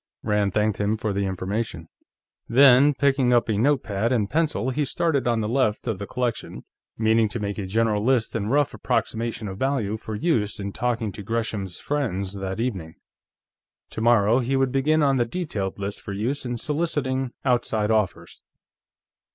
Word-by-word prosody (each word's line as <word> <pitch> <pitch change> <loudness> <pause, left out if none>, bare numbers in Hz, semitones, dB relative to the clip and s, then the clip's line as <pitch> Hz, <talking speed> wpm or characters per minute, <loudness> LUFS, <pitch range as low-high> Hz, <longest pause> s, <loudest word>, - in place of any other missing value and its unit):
Rand 105 -1 +1
thanked 105 -1 +1
him 105 +2 +1
for 110 -1 -2
the 100 0 -1
information. 95 +4 -3 0.6
Then, 135 +3 +6
picking 135 -3 +2
up 120 - +3
a 110 - +1
note 130 +6 +2
pad 110 +2 -1
and 110 -5 +1
pencil, 135 -4 0
he 150 +4 0
started 145 -3 0
on 115 -2 +1
the 105 - -1
left 115 -3 0
of 110 -6 -2
the 100 - -5
collection, 125 -2 -3 0.3
meaning 110 0 +3
to 120 - -4
make 100 0 -3
a 95 - -4
general 110 +1 +1
list 125 -2 +1
and 105 -1 -1
rough 145 +2 +2
approximation 115 -2 -2
of 95 0 -7
value 125 -6 0
for 110 0 -6
use 105 -6 0
in 100 0 -4
talking 115 -3 -1
to 105 - -8
Gresham's 105 -3 -3
friends 100 -10 -2
that 95 0 -4
evening. 95 -10 -3 1.0
Tomorrow 115 0 +3
he 130 +2 0
would 135 -1 +2
begin 150 +4 +2
on 135 -2 +3
the 120 - +2
detailed 115 - -4
list 100 0 -5
for 100 - -6
use 125 +7 -2
in 120 0 -3
soliciting 135 -3 -1
outside 115 -4 +1
offers. 105 -4 -1
115 Hz, 175 wpm, -24 LUFS, 105-130 Hz, 1.0 s, Then